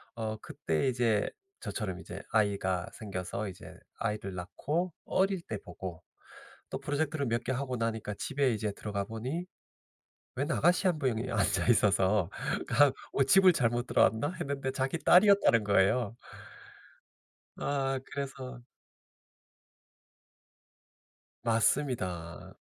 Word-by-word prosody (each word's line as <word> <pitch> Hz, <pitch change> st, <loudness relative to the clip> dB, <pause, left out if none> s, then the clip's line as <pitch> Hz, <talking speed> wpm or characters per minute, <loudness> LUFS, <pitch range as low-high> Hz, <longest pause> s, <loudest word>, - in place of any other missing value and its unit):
어 110 Hz, -1 st, -3 dB
그때 80 Hz, -, -2 dB
이제 120 Hz, -4 st, +1 dB, 0.3 s
저처럼 95 Hz, -5 st, -4 dB
이제 95 Hz, +3 st, -8 dB
아이가 100 Hz, -4 st, +1 dB
생겨서 100 Hz, -1 st, -4 dB
이제 90 Hz, -, -11 dB, 0.2 s
아이를 105 Hz, -4 st, -3 dB
낳고 155 Hz, -, -2 dB
어릴 190 Hz, -1 st, +1 dB
때 110 Hz, -9 st, -5 dB
보고 90 Hz, -1 st, -8 dB, 0.7 s
또 -, -, -3 dB
프로젝트를 145 Hz, 0 st, -1 dB
몇 115 Hz, +1 st, 0 dB
개 130 Hz, -, -2 dB
하고 130 Hz, -1 st, -2 dB
나니까 110 Hz, -2 st, -2 dB
집에 140 Hz, -4 st, 0 dB
이제 105 Hz, -1 st, -2 dB
들어가 100 Hz, -2 st, -3 dB
보니 130 Hz, -, -4 dB, 0.9 s
웬 145 Hz, +5 st, -1 dB
아가씨 175 Hz, +5 st, +3 dB
1 165 Hz, -4 st, +1 dB
분이 125 Hz, -4 st, -1 dB
앉아 100 Hz, -4 st, +1 dB
있어서 100 Hz, -4 st, +3 dB, 0.4 s
그냥 145 Hz, -2 st, +5 dB, 0.2 s
'어 135 Hz, -, +3 dB
집을 190 Hz, +6 st, +6 dB
잘못 120 Hz, -3 st, 0 dB
들어왔나?' 115 Hz, +7 st, +3 dB
했는데 140 Hz, -4 st, -2 dB
자기 135 Hz, +5 st, -1 dB
딸이었다는 185 Hz, -, +6 dB
거예요. 100 Hz, +3 st, +2 dB, 1.4 s
아 135 Hz, -2 st, -1 dB
그래서 130 Hz, -3 st, -6 dB, 2.8 s
맞습니다. 110 Hz, -, 0 dB
120 Hz, 245 characters per minute, -31 LUFS, 105-140 Hz, 2.8 s, 집을